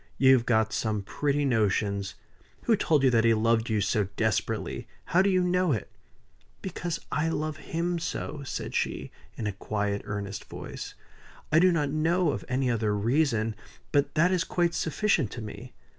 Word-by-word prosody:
You've 130 -3 +5
got 110 -2 +2
some 105 -2 -1
pretty 145 +6 0
notions! 100 -5 0 0.5
Who 230 - +4
told 155 -8 +2
you 130 - +5
that 115 -2 +4
he 115 -1 +5
loved 115 +1 +2
you 110 -2 +1
so 100 +1 +1
desperately? 110 -2 -1 0.2
How 180 - +3
do 195 - +3
you 185 -1 +3
know 180 -3 +2
it?" 110 - -4 0.7
"Because 175 -2 -3
I 160 +2 +1
love 155 -1 -2
him 170 +1 -2
so," 150 -2 -4
said 130 - -5
she, - - -2 0.3
in 110 - -3
a 105 - 0
quiet, 100 0 -2
earnest 100 -1 -5
voice. - - -8 0.6
"I 155 - +6
do 185 +1 +5
not 150 -4 0
know 165 +2 +2
of - - -4
any 130 +1 0
other 110 -2 0
reason; 115 0 +1 0.4
but 145 +1 +1
that 170 +4 +4
is 185 -2 +2
quite 175 -2 0
sufficient 160 - +1
to 120 - -6
me. 105 - -8
130 Hz, 175 wpm, -28 LUFS, 110-165 Hz, 0.7 s, I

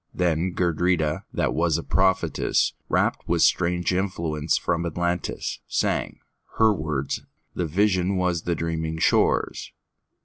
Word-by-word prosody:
Then 85 0 0
Gudrida, 85 -2 +1
that - - 0
was 80 -1 +1
a 85 - -4
prophetess, 95 -3 +1 0.2
Rapt - - 0
with - - +2
strange 90 0 +2
influence 85 -5 -1
from 85 - -1
Atlantis, 85 +1 -2
sang:Her 110 -1 -1
words: 75 -6 -3 0.3
the 90 - -2
vision 95 +2 +1
was 90 -3 0
the 85 0 -1
dreaming 80 -1 -3
shore's. 80 - +1
85 Hz, 115 wpm, -24 LUFS, 80-90 Hz, 0.3 s, with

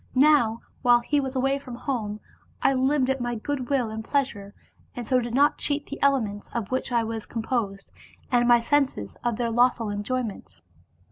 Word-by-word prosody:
Now 255 -5 +4 0.2
while 240 -1 +5
he 290 +4 +1
was 265 -1 -3
away 270 +2 +1
from 255 -3 -9
home, 220 -5 -3 0.4
I - - +3
lived 265 +1 +2
at 265 -1 -2
my 240 0 -2
good 255 +2 -4
will 255 -6 +1
and 220 0 -5
pleasure, 220 -7 -2 0.4
and 245 - -5
so 255 +3 +3
did 240 -1 -3
not 285 +2 +3
cheat 290 0 -1
the 285 - -8
elements, 225 -8 +1
of 225 -2 -3
which 260 0 -1
I 235 -1 +2
was 225 -1 -4
composed, 220 -4 -3 0.4
and 240 -1 +3
my 240 -1 +6
senses, 245 - 0
of 240 -2 0
their 235 -1 -1
lawful 240 -2 +2
enjoyment. 205 - -4
245 Hz, 185 wpm, -25 LUFS, 225-270 Hz, 0.4 s, my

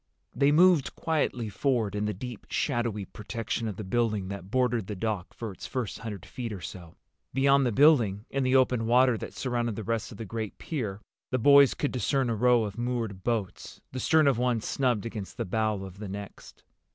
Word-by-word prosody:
They 140 +3 +3
moved 170 -2 +4
quietly 150 -7 -1
forward, 110 0 0
in 105 0 -1
the 105 - 0
deep 120 +2 -8
shadowy 120 -7 -1
protection 115 +3 -4
of 105 - -4
the 105 - -6
building 105 -1 0
that 100 -2 -7
bordered 120 -4 +1
the 105 - -4
dock 100 -2 -3
for 115 -3 -6
its 95 - -9
first 125 -6 -3
hundred 105 -6 -7
feet 120 -3 -6
or 100 - -5
so. 85 -2 -9 0.4
Beyond 135 0 +4
the - - +1
building, 115 -7 +4
in 135 - 0
the 130 0 +2
open 125 -3 +3
water 125 +1 +5
that - - -7
surrounded 120 -3 -1
the 110 - -5
rest 115 +2 -2
of 105 - -10
the 115 - -6
great 110 0 -5
pier, 105 - -4 0.3
the 130 - 0
boys 140 +2 +6
could 145 - -1
discern 130 +1 0
a - - 0
row 120 +1 +4
of 105 +1 -5
moored 115 -6 -2
boats, 110 -5 -3
the 130 - -4
stern 155 +4 +4
of 135 -4 +3
one 125 -2 +1
snubbed 120 -1 0
against 110 -4 -6
the - - -2
bow 110 0 -1
of 95 0 -10
the 105 -2 -6
next. 100 +1 -9
115 Hz, 205 wpm, -28 LUFS, 105-130 Hz, 0.4 s, boys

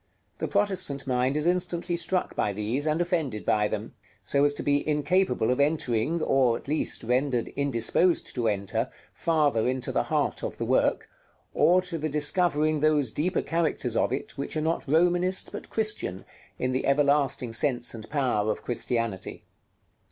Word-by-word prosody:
The - - -2
Protestant 190 -9 0
mind 130 +2 0
is 150 - 0
instantly 175 -1 0
struck 175 +2 -1
by 105 - 0
these, 115 +9 -2
and 155 +1 +1
offended 160 - -1
by 105 -1 +2
them, - - -5 0.3
so 140 0 +2
as 145 0 +2
to - - -4
be 145 0 +2
incapable 150 -5 +1
of 125 - -1
entering, 150 +1 +1
or 130 -4 +2
at - - -15
least 155 +2 0
rendered 125 +1 0
indisposed 140 +6 +1
to 120 -3 -1
enter, 105 +3 -1 0.2
farther 150 -9 +1
into 130 0 -2
the - - +1
heart - - -1
of - - -4
the - - -3
work, - - +1 0.5
or 185 +1 +4
to 175 -3 -4
the 155 +1 -2
discovering 150 0 +3
those 150 -5 +2
deeper 170 +5 -1
characters 155 -7 -1
of - - +1
it, 130 - -4
which 140 - -3
are - - 0
not 160 +2 -1
Romanist, 175 +4 +1
but - - -8
Christian, 215 - -2 0.3
in 130 - -1
the 130 - -1
everlasting 140 -3 +2
sense 120 0 +2
and 110 -2 -9
power 125 -8 0
of - - -5
Christianity. 115 -4 -3
145 Hz, 165 wpm, -26 LUFS, 125-165 Hz, 0.5 s, or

